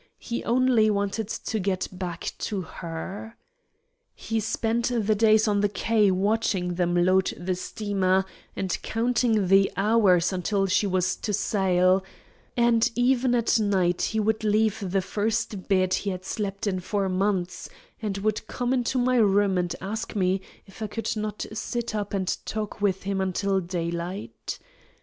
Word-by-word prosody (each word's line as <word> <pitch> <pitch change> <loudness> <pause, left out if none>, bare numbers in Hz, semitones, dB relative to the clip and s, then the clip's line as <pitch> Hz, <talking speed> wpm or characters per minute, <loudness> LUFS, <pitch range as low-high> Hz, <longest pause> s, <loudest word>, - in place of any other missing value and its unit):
He 235 - -4
only 240 -2 +3
wanted 200 +1 -1
to 220 0 -3
get 185 -1 -1
back 180 -2 -5
to 205 -3 -2
her. 185 +6 -7 0.8
He 225 0 -2
spent 225 +2 0
the 225 -4 +1
days 220 +1 +4
on 205 -1 +2
the 205 - +2
quay 210 +1 +2
watching 190 -2 +1
them 175 0 0
load 185 +2 +3
the 180 +2 -2
steamer, 190 0 0 0.3
and 190 -1 -1
counting 225 -3 +1
the 195 +1 +5
hours 195 -4 +3
until 195 +2 0
she 195 +2 +2
was 185 -1 +1
to 210 - -3
sail; 190 -2 +2 0.5
and 235 -1 +4
even 245 0 +2
at 235 -1 +2
night 190 -4 +1
he 220 - 0
would 220 +1 0
leave 215 0 +2
the 190 +1 +1
first 215 0 -2
bed 185 -1 +2
he 205 - 0
had 185 -1 -5
slept 200 0 -3
in 190 -3 0
for 200 +2 -1
six 190 - -1
months, 185 -2 -1 0.3
and 205 -3 -2
would 215 +1 -1
come 245 +1 -1
into 255 0 0
my 250 0 +2
room 205 -3 +3
and 175 -1 -1
ask 220 +4 -4
me 190 -1 +1 0.2
if 195 +2 -15
I 215 - -3
would 225 0 -2
not 210 0 -3
sit 235 +1 -3
up 205 -2 -3
and 190 -2 -1 0.2
talk 215 -1 -4
with 195 -2 +1
him 195 0 -1
until 190 +1 0
daylight. 170 - -4
200 Hz, 160 wpm, -26 LUFS, 185-220 Hz, 0.8 s, the